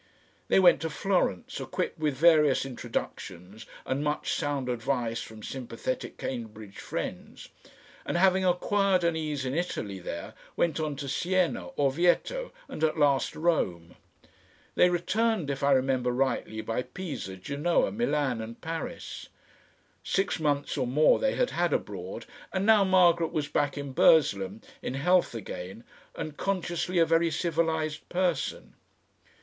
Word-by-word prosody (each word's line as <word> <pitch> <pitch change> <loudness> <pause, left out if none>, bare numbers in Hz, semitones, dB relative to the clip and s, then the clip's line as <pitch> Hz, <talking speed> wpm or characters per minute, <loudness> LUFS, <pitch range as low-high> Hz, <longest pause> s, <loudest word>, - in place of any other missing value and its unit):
They - - +4
went 180 -2 +6
to 160 - -2
Florence, 175 - -1
equipped - - -3
with 150 -3 0
various 150 -3 +5
introductions 105 -6 -6 0.2
and 135 +2 -1
much 150 0 -1
sound 145 -3 -2
advice 120 -1 -1
from 110 -1 -10
sympathetic 130 -1 -5
Cambridge 110 -5 -6
friends, - - -6 0.5
and - - -2
having 190 +1 +4
acquired 185 +1 +2
an 170 -1 +2
ease 150 -4 -2
in 130 - -2
Italy 110 - -3
there, 85 -1 -6 0.2
went 165 -2 +1
on 155 -2 -2
to 140 0 -6
Siena, 175 - 0
Orvieto, 175 - +1 0.2
and 155 - -6
at 160 0 +2
last 145 -3 +2
Rome. 90 - 0 0.8
They 180 - +5
returned, 180 -1 0
if 135 - -4
I 140 - +3
remember 130 -2 +2
rightly, 125 -4 -1
by 115 +2 -2
Pisa, 135 - -6
Genoa, 140 - 0
Milan 150 - 0
and 115 +1 -8
Paris. 165 0 -6 0.7
Six 195 -2 0
months 145 -1 0
or 130 - 0
more 150 +5 +4
they - - +1
had - - +1
had - - +1
abroad, - - -4 0.3
and 190 +1 -1
now 220 -2 +6
Margaret 175 -3 +4
was 150 -2 -1
back 145 0 0
in 140 -1 -5
Burslem, 105 - +3 0.2
in 125 - -4
health 180 0 +2
again 95 0 -7 0.3
and 155 -1 -6
consciously 180 -2 -1
a 165 - +6
very 165 +1 +3
civilised 160 -1 -1
person. 175 -4 -1
150 Hz, 140 wpm, -28 LUFS, 130-175 Hz, 0.8 s, went